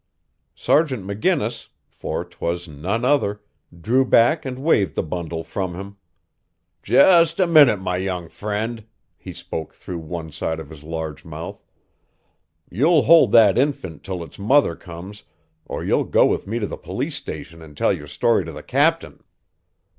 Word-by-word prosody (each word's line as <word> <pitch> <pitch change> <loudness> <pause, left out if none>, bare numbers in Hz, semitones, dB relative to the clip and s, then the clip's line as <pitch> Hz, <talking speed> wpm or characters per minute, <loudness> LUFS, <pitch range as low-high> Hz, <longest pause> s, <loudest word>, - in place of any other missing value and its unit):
Sergeant 135 - +1
McGinnis 115 - -1 0.2
for - - -5
'twas 85 +1 -4
none 90 - -3
other 125 -7 +1 0.4
drew 125 +8 +3
back 135 +6 +3
and 130 -1 -4
waved 130 - +1
the - - 0
bundle 80 0 -5
from 95 -2 -4
him. 100 +2 -9 0.8
"Just 170 -2 +5
a 185 - +4
minute, 150 - +6
my 90 -1 -2
young 90 -2 -3
friend," 105 +4 -4 0.3
he - - -10
spoke 80 - -7
through 90 -2 -7
one 80 0 -7
side 80 +1 -3
of 80 - -10
his 75 -2 -11
large 80 -1 -5
mouth. - - -8 1.0
"You'll 150 - +3
hold 165 -1 +6
that 110 -2 +6
infant 125 - -2
till 95 -3 -5
its 85 - -13
mother 115 - +3
comes 90 +5 -10 0.5
or - - -5
you'll - - +1
go - - +4
with - - -1
me 110 +4 -2
to 110 - -1
the - - -6
police - - -4
station 80 +2 -8
and 75 -2 -14
tell - - +2
your 75 - -7
story 90 +9 +1
to 80 - -7
the - - -10
captain." - - 0
100 Hz, 160 wpm, -21 LUFS, 85-125 Hz, 1.0 s, minute